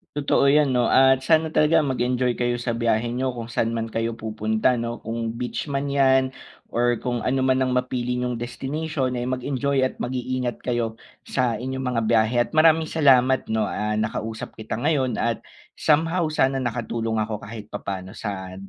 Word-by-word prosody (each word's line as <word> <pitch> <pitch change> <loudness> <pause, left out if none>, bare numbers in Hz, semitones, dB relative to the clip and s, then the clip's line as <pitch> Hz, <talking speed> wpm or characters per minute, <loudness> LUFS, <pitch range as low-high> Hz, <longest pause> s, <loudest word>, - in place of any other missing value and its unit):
Totoo 140 -1 +2
'yan 145 0 +4
no. 125 -2 +2
At 130 0 +5
sana 160 -1 +3
talaga 155 +1 +4
mag 130 -4 -2
enjoy 125 0 +1
kayo 120 0 +1
sa 120 0 -2
biyahe 115 0 0
niyo 130 +1 -1
kung 115 -1 -6
saan 115 +1 0
man 115 0 -3
kayo 115 +1 -2
pupunta 110 +2 0
no. 115 0 -4
Kung 115 0 -3
beach 125 +5 -4
man 140 0 -2
'yan 130 -1 +3 0.4
or 120 0 +2
kung 120 -1 -1
ano 130 +1 +1
man 130 0 +3
ang 130 -1 +1
mapili 125 -1 -1
'yung 125 -1 -1
destination 135 +3 -3
ay 120 0 -2
mag-enjoy 130 +1 0
at 130 - -1
mag-iingat 125 0 -3
kayo 120 -2 -1 0.3
sa 125 -4 0
inyong 130 +1 -4
mga 115 - +1
biyahe. 110 +1 +3
At - - -18
maraming 160 0 +5
salamat 130 -4 +4
no, 110 -1 +1
ah, 105 0 -2
nakausap 110 +1 -4
kita 110 0 -5
ngayon. 135 -4 +1
At 115 -1 -1 0.3
somehow 165 +3 +2
sana 135 -3 +2
nakatulong 115 -2 -2
ako 105 0 -4
kahit 110 -1 -8
papaano 95 -1 -6
sa 95 -3 -5
125 Hz, 175 wpm, -23 LUFS, 115-135 Hz, 0.4 s, At